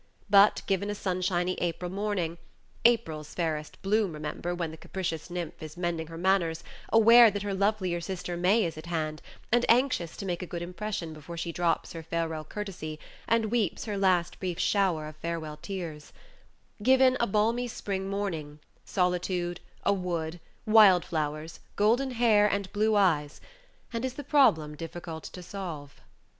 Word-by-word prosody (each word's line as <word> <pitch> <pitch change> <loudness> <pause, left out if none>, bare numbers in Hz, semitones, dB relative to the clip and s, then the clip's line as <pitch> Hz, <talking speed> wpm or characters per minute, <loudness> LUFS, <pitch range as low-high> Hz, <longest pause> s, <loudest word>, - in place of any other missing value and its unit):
But, 200 +1 +6
given 195 +1 0
a 205 - -2
sunshiny 185 -2 0
April 175 +1 -2
morning 190 -4 -2 0.5
(April's 160 -11 +2
fairest 155 -3 -3
bloom, 205 -2 +1
remember, 155 +3 -4
when 170 -2 -3
the - - -8
capricious 170 -2 -4
nymph 175 -2 -5
is 155 +1 -8
mending 170 -2 -2
her 165 0 -9
manners, 170 -3 +1 0.3
aware 230 +1 +8
that 205 0 -4
her 200 -1 -2
lovelier 190 -3 0
sister 180 0 -4
May 185 +5 +3
is 165 -2 -4
at 160 - -10
hand, 155 -2 -2 0.3
and 240 +1 +4
anxious 235 - +2
to 200 - -5
make 175 -2 -2
a 180 - -5
good 170 0 -5
impression 180 -2 -4
before 155 +3 -9
she 170 0 -3
drops 170 -1 0
her 165 - -6
farewell 160 -1 -3
courtesy, 165 -4 -6 0.3
and 225 -2 +2
weeps 225 -7 0
her 210 -2 -3
last 185 -3 +1
brief 180 -3 -3
shower 185 -6 +1
of 155 0 -10
farewell 155 -2 -4
tears) 170 -6 -6 0.7
given 260 +2 +5
a 235 - +2
balmy 225 +4 +1
spring 195 -4 -4
morning, 170 -7 -3 0.3
solitude, 180 -1 -1 0.2
a 200 - +3
wood, 175 -3 -3 0.3
wild 210 -5 +7
flowers, 155 0 -3 0.2
golden 235 +6 +3
hair, 225 -4 +4
and 200 -1 -2
blue 215 +1 +2
eyes, 155 -7 +2 0.5
and 230 +1 -2
is 260 -1 -2
the 290 - -6
problem 165 - +3
difficult 165 +1 -7
to 180 - -9
solve? 170 -7 -7
180 Hz, 160 wpm, -28 LUFS, 165-205 Hz, 0.7 s, aware